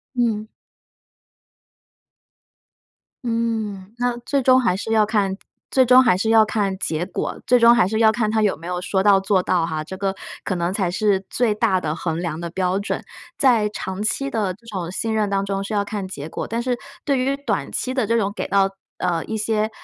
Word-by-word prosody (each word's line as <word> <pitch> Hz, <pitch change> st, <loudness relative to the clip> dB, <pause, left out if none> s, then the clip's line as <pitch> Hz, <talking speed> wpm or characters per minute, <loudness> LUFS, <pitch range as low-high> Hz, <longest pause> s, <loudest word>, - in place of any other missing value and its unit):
嗯。 225 Hz, -3 st, 0 dB, 2.8 s
嗯， 220 Hz, -4 st, -2 dB
那 245 Hz, -1 st, +1 dB
最 270 Hz, +3 st, -1 dB
终 255 Hz, 0 st, +5 dB
还 230 Hz, -7 st, +2 dB
是 220 Hz, -, -4 dB
要 215 Hz, -1 st, +4 dB
看 205 Hz, -3 st, 0 dB, 0.4 s
最 260 Hz, -1 st, +4 dB
终 255 Hz, +1 st, +7 dB
还 200 Hz, -, +4 dB
是 220 Hz, +4 st, 0 dB
要 225 Hz, -1 st, +6 dB
看 205 Hz, -3 st, -1 dB
结 160 Hz, -1 st, -2 dB
果， 185 Hz, -, -4 dB
最 250 Hz, -, +5 dB
终 235 Hz, 0 st, +7 dB
还 180 Hz, -, +4 dB
是 220 Hz, +3 st, -1 dB
要 220 Hz, -1 st, +6 dB
看 220 Hz, -1 st, 0 dB
他 220 Hz, 0 st, +2 dB
有 210 Hz, -2 st, +2 dB
没 165 Hz, -, -10 dB
有 180 Hz, 0 st, -2 dB
说 190 Hz, +1 st, 0 dB
到 200 Hz, -1 st, +6 dB
做 195 Hz, -1 st, +2 dB
到 175 Hz, -3 st, +1 dB
哈， 155 Hz, -2 st, -3 dB
这 190 Hz, +4 st, -8 dB
个 195 Hz, 0 st, -1 dB, 0.3 s
可 185 Hz, -, -2 dB
能 170 Hz, 0 st, -1 dB
才 195 Hz, -3 st, 0 dB
是 195 Hz, 0 st, +1 dB
最 235 Hz, -3 st, +1 dB
大 210 Hz, -4 st, +2 dB
的 155 Hz, -2 st, -2 dB
衡 165 Hz, -1 st, -3 dB
量 165 Hz, -3 st, -3 dB
的 170 Hz, 0 st, -4 dB
标 185 Hz, +2 st, 0 dB
准。 200 Hz, -, -3 dB, 0.3 s
在 235 Hz, -6 st, +4 dB
长 190 Hz, -1 st, -5 dB
期 275 Hz, +6 st, -1 dB
的 210 Hz, -7 st, -1 dB
这 215 Hz, +5 st, -21 dB
种 185 Hz, -6 st, -4 dB
信 220 Hz, +5 st, -2 dB
任 215 Hz, -2 st, +1 dB
当 195 Hz, 0 st, 0 dB
中 195 Hz, 0 st, -2 dB
是 200 Hz, -, -5 dB
要 205 Hz, -1 st, +1 dB
看 200 Hz, -2 st, -4 dB
结 155 Hz, -5 st, -7 dB
果， -, -, -5 dB
但 230 Hz, +1 st, -2 dB
是 250 Hz, -1 st, 0 dB, 0.3 s
对 280 Hz, -2 st, +1 dB
于 265 Hz, +2 st, +1 dB
短 280 Hz, 0 st, -3 dB
期 255 Hz, -, -2 dB
的 255 Hz, -5 st, 0 dB
这 230 Hz, -, +2 dB
种 205 Hz, -3 st, 0 dB
给 -, -, -4 dB
到， 195 Hz, -1 st, +3 dB, 0.3 s
呃， 170 Hz, -3 st, 0 dB
一 220 Hz, -, -4 dB
些， 215 Hz, 0 st, 0 dB
210 Hz, 225 characters per minute, -22 LUFS, 190-230 Hz, 2.8 s, 终